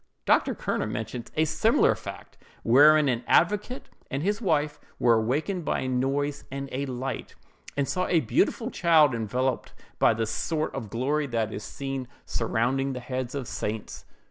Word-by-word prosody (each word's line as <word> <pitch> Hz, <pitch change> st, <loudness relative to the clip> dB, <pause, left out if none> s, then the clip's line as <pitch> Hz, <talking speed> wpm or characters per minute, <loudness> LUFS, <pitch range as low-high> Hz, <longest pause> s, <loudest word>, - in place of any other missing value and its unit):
Dr. -, -, +3 dB
Kerner -, -, -2 dB
mentions 115 Hz, +2 st, -5 dB
a 155 Hz, -, +4 dB
similar -, -, +3 dB
fact, -, -, -9 dB, 0.3 s
wherein 150 Hz, +5 st, +6 dB
an 120 Hz, -2 st, 0 dB
advocate 210 Hz, +8 st, +2 dB, 0.2 s
and 135 Hz, +2 st, -2 dB
his 205 Hz, +4 st, 0 dB
wife 150 Hz, -6 st, 0 dB, 0.2 s
were 120 Hz, -, +4 dB
awakened 145 Hz, -, 0 dB
by -, -, -1 dB
a 130 Hz, -, -2 dB
noise 135 Hz, +3 st, -1 dB
and 140 Hz, +1 st, -5 dB
a 140 Hz, +2 st, -2 dB
light, 130 Hz, 0 st, -5 dB, 0.4 s
and 140 Hz, -1 st, +1 dB
saw 180 Hz, 0 st, -1 dB
a 170 Hz, -, +3 dB
beautiful 225 Hz, -, 0 dB
child 160 Hz, -5 st, +4 dB
enveloped 125 Hz, +3 st, -2 dB, 0.3 s
by 115 Hz, -, +4 dB
the 115 Hz, 0 st, 0 dB
sort 155 Hz, +8 st, -2 dB
of 115 Hz, -6 st, -5 dB
glory 140 Hz, +7 st, 0 dB
that 115 Hz, -3 st, -1 dB
is 105 Hz, -, -5 dB
seen 135 Hz, -1 st, -5 dB, 0.2 s
surrounding 130 Hz, +4 st, 0 dB
the 125 Hz, -, -4 dB
heads 125 Hz, +1 st, -4 dB
of 135 Hz, -4 st, -4 dB
saints. 105 Hz, +1 st, -5 dB
135 Hz, 165 wpm, -27 LUFS, 120-150 Hz, 0.4 s, wherein